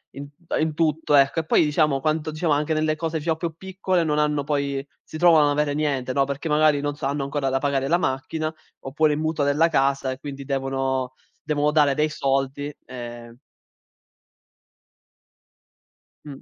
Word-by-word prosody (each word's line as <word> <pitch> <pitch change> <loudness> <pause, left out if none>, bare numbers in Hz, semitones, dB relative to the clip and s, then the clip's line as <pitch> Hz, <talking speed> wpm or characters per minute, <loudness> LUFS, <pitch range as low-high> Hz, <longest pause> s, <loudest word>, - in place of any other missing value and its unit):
in 140 +1 -8 0.2
t - - -32
ehm, - - +1
in 155 0 0
tutto, 155 -2 +1
ecco, 140 +3 +4
e 160 - -3
poi 160 - +4
diciamo 150 -2 +2
quanto 155 +2 -1
diciamo 155 0 0
anche 150 +2 0
nelle 155 0 +1
cose 160 0 -3
diciamo 160 +1 -1
più 165 -1 -4
piccole 185 -1 -1
non 150 -1 0
hanno 150 -1 +1
poi 140 -1 -2 0.2
si 155 - -9
trovano 170 -2 +6
a - - +2
non - - +2
avere 150 0 0
niente, 140 -4 -1
no, 140 - +3
perché 140 +3 -4
magari, 150 -1 +3
non 145 0 -2
so, 145 - -6
hanno 140 +1 -1
ancora 140 -1 -2
da 135 - +1
pagare 135 -1 0
la 170 - +3
macchina, 155 +1 -2 0.3
oppure 150 +3 +1
il 145 - -2
mutuo 155 -1 -1
della 145 +4 +3
casa, 135 -3 +1
e 130 - -7
quindi 140 -1 -7
devono 135 -1 -2 0.3
devono 150 -1 +1
dare 150 -2 +4
dei 155 0 +1
soldi, 135 0 -1
ehm 120 -2 -9 2.9
Mh. 140 -2 -9
145 Hz, 185 wpm, -23 LUFS, 135-155 Hz, 2.9 s, trovano